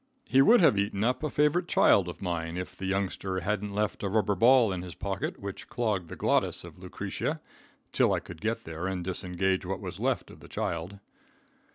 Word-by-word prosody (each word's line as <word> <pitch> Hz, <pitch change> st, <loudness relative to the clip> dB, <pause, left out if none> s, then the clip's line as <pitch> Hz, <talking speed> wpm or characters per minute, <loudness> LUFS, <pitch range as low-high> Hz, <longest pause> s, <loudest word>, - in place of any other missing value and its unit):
He 135 Hz, -, +4 dB
would 230 Hz, -, +6 dB
have 110 Hz, -, +5 dB
eaten 100 Hz, 0 st, -1 dB
up 125 Hz, +2 st, +1 dB
a 155 Hz, -, -1 dB
favorite 150 Hz, +6 st, +2 dB
child 95 Hz, -, +4 dB
of 90 Hz, -, -8 dB
mine, 85 Hz, -1 st, -2 dB
if 90 Hz, -, -5 dB
the 95 Hz, -, -5 dB
youngster 95 Hz, -1 st, -1 dB
hadn't 105 Hz, +3 st, -1 dB
left 105 Hz, +1 st, -1 dB
a 100 Hz, -, -1 dB
rubber 105 Hz, 0 st, +2 dB
ball 115 Hz, +2 st, +5 dB
in 90 Hz, -, -4 dB
his 90 Hz, -2 st, -8 dB
pocket 95 Hz, -1 st, -3 dB
which 100 Hz, -1 st, -7 dB
clogged 105 Hz, -8 st, -1 dB
the -, -, -6 dB
glottis -, -, +1 dB
of -, -, -12 dB
Lucretia -, -, -4 dB, 0.5 s
till -, -, +3 dB
I -, -, +2 dB
could 85 Hz, -2 st, -11 dB
get 115 Hz, +2 st, -1 dB
there 80 Hz, +3 st, -5 dB
and 95 Hz, -2 st, -3 dB
disengage 95 Hz, +1 st, -1 dB
what 95 Hz, +1 st, -3 dB
was -, -, -7 dB
left -, -, -1 dB
of -, -, -14 dB
the -, -, -13 dB
child. 85 Hz, +4 st, -3 dB
95 Hz, 205 wpm, -29 LUFS, 90-110 Hz, 0.5 s, would